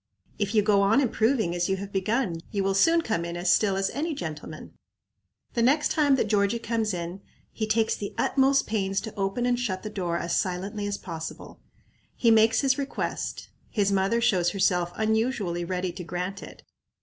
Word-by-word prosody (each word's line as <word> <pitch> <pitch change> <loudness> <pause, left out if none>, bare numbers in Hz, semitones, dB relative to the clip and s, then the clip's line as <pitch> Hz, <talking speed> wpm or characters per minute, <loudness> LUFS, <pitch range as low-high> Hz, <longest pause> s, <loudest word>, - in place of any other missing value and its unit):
If 205 +1 -1
you 210 - +5
go 205 -1 +4
on 200 +6 +4
improving 225 -6 +1
as 175 +1 -1
you 190 - +2
have 200 +1 -7
begun, 200 -1 0
you 200 -1 -1
will 195 0 +1
soon 330 +12 +4
come 215 - -1
in 170 0 -5
as 175 0 +3
still 200 -1 +2
as 195 0 0
any 310 +2 -2
gentleman." 155 - -7 0.8
The 235 - 0
next 290 +6 +3
time 290 -3 +3
that 265 - +1
Georgie 200 +2 +2
comes 225 -2 -1
in, 175 +1 -5 0.3
he 215 - -3
takes 220 0 +2
the 200 - -6
utmost 275 0 +3
pains 195 -3 -1
to 220 - -7
open 200 +4 -1
and 245 -1 +1
shut 190 -7 -2
the 215 - -5
door 175 -4 -2
as 170 0 -2
silently 195 +3 -2
as 205 0 -2
possible. 165 -2 -8 0.6
He 230 - +3
makes 225 0 +5
his 270 -1 +2
request. 280 0 -4 0.2
His 200 -2 +1
mother 195 +4 +1
shows 185 -7 +3
herself 180 -2 +1
unusually 220 -5 0
ready 180 +1 -2
to 180 - -8
grant 180 +3 -4
it. - - -12
200 Hz, 190 wpm, -26 LUFS, 185-230 Hz, 0.8 s, you